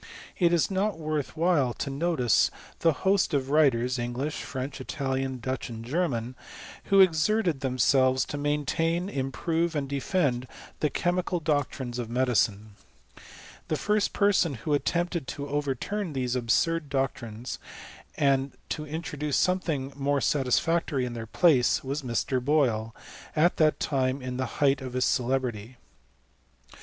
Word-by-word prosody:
It 175 -2 +4
is 170 +2 +2
not 195 0 0
worth 155 -3 -3
while 155 -8 +2
to 140 - -4
notice 135 - +2 0.3
the 165 - +4
host 190 -5 +3
of 135 -1 -1
wrilers— 130 -5 +3
I 120 - -1
Bngliah, 130 +5 -3
French, 135 -1 -5
Italian, 135 -1 -2
Dutch, 130 +2 -4
and 115 -1 -7
German, 125 -5 -1 0.5
who 195 0 +5
i - - +11
exerted 175 -1 +1
themselves 130 0 +2
to - - -6
maintain, 165 +5 0
improve, 160 +4 -1
and 140 -2 -1
defend, 140 -3 0 0.3
the 150 - +1
chemical 175 +4 0
doctrines 140 -5 -2
of 120 -2 -4
medicine. 115 -4 +1 1.0
The 155 - 0
first 210 +3 +1
person 195 -7 +2
who 145 +6 -2
attempted 170 0 0
to 140 -1 -5
overturn 145 - -2
these 130 -2 -1
absurd 145 +6 +1
doctrines, 125 -4 -3 0.6
and 135 -1 +2 0.2
to 150 -1 -4
introduce 150 -2 -3
something 160 -7 0
more 140 0 0
satisfactory 140 +1 +1
in 120 - -5
their 115 -1 -6
idaee, 135 -2 +3
was 140 +3 -3
Mr. 125 0 -1
Boyle, 120 -6 +1 0.4
at 165 +3 +3
that 155 -1 +3
time 135 -2 0
in 125 -1 -5
the 130 - -1 0.2
height 140 0 +3
of 130 -1 -6
nil 130 - -1
celebrity. 125 -3 -1
140 Hz, 140 wpm, -27 LUFS, 130-165 Hz, 1.0 s, i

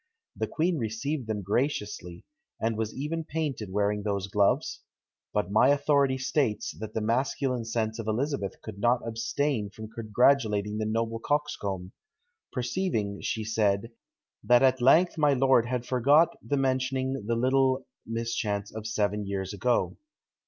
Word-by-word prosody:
The - - -2
queen 165 0 0
received 120 +4 -3
them 105 -2 -2
graciously, 105 - -2 0.3
and 115 0 0
was 110 0 -2
even 160 +4 -3
painted 150 -10 -3
wearing 105 +1 +1
those 100 -2 -2
gloves; 100 0 +1 0.5
but 105 -2 -1
my 110 +5 +5
authority 140 -2 +3
states, 130 -4 -1
that 110 0 -7
the 110 - 0
masculine 125 +2 0
sense 110 0 -2
of 110 - -5
Elizabeth 120 -2 -2
could 105 -3 -8
not 120 +2 +2
abstain 115 0 -1
from 110 +2 -9
congratulating 110 -2 +2
the 110 - -1
noble 115 +1 -1
coxcomb; 100 -11 -2 0.6
perceiving, 120 - -2
she 110 - -2
said, 110 0 0 0.5
that 120 +1 +5
at 130 -1 +4
length 165 +7 +5
my 150 -2 +4
lord 130 -2 +4
had 125 -1 -2
forgot 140 +7 +4
the 145 - -1
mentioning 130 -1 0
the 115 - +1
little 130 +2 +2 0.2
mischance 115 -3 -2
of 110 0 -5
seven 105 -2 -1
years 95 0 -3
ago! 120 +4 0
115 Hz, 145 wpm, -28 LUFS, 105-135 Hz, 0.6 s, my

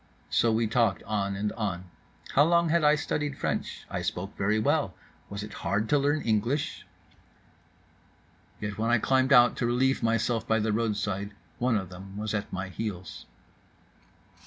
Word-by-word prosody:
—So 115 - +3
we 115 +1 +2
talked 110 -2 +1
on 100 -2 -1
and 105 +1 -1
on: 95 -5 -3 0.5
How 145 - +5
long 170 +1 +3
had 170 0 +3
I 150 0 +6
studied 145 -1 -2
French? - - -3
I - - -3
spoke 95 +3 -4
very 105 +2 +1
well. 110 - +1 0.3
Was 100 +1 -5
it 105 - -8
hard 105 +3 0
to 145 - +4
learn 145 +2 +1
English?— 115 +6 -1 1.7
Yet 105 0 -5
when 115 +1 +1
I 120 - +5
climbed 130 +3 +2
out 120 -2 +7
to 120 - 0
relieve 130 +3 +2
myself 115 0 0
by 110 - +3
the 110 -1 0
roadside 105 -2 -1 0.2
one 120 -2 +2
of 95 -3 -4
them 95 +2 -10
was 110 +1 -3
at 105 -2 -3
my 95 0 -4
heels. 95 -3 -6
110 Hz, 165 wpm, -28 LUFS, 100-125 Hz, 1.7 s, out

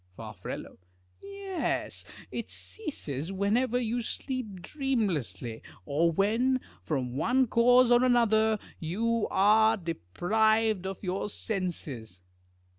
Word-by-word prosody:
Far. 110 -2 -8 0.9
Yes, 395 -2 -3 0.3
it - - -4
ceases 165 - -5
whenever 220 +6 +1
you 240 0 -1
sleep 225 -6 -4
dreamlessly, 170 - -2 0.2
or 160 +4 +2
when, 230 +9 +2 0.2
from 130 -5 -2
one 255 - +3
cause 245 +2 +5
or 240 +1 +6
another, 220 -3 +4 0.2
you 225 +7 0
are 220 +3 +5
deprived 195 - +1
of 195 +2 -6
your 190 +2 -2
senses. 145 - -4
215 Hz, 100 wpm, -29 LUFS, 170-240 Hz, 0.9 s, or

